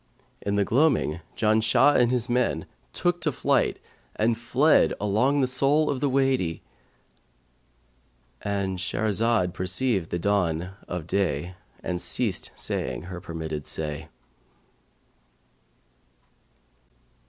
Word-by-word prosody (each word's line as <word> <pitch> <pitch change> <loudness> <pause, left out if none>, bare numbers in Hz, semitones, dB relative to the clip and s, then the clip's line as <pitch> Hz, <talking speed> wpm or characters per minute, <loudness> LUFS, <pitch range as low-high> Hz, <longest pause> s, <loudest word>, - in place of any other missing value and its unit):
In 100 0 -1
the 100 -1 +2
gloaming 125 - +2 0.2
Janshah 115 +5 +4
and 120 -1 +4
his 125 -2 0
men 120 -10 0 0.3
took 175 0 -1
to 155 - +1
flight - - +1 0.4
and 115 +2 +2
fled 125 +7 +3
along 120 +8 +2
the - - +4
sole 140 +4 +2
of 135 - -2
the 140 - +1
Wady."—And 65 - -5
Shahrazad 105 0 +1
perceived 95 0 -1
the - - -2
dawn 90 -2 0 0.2
of 90 -3 -4
day 90 -2 -1 0.3
and 90 -1 -3
ceased 90 +4 +1
saying - - -3
her 90 0 -7
permitted 80 -4 -5
say. 75 -2 -4
100 Hz, 105 wpm, -26 LUFS, 80-125 Hz, 0.4 s, Janshah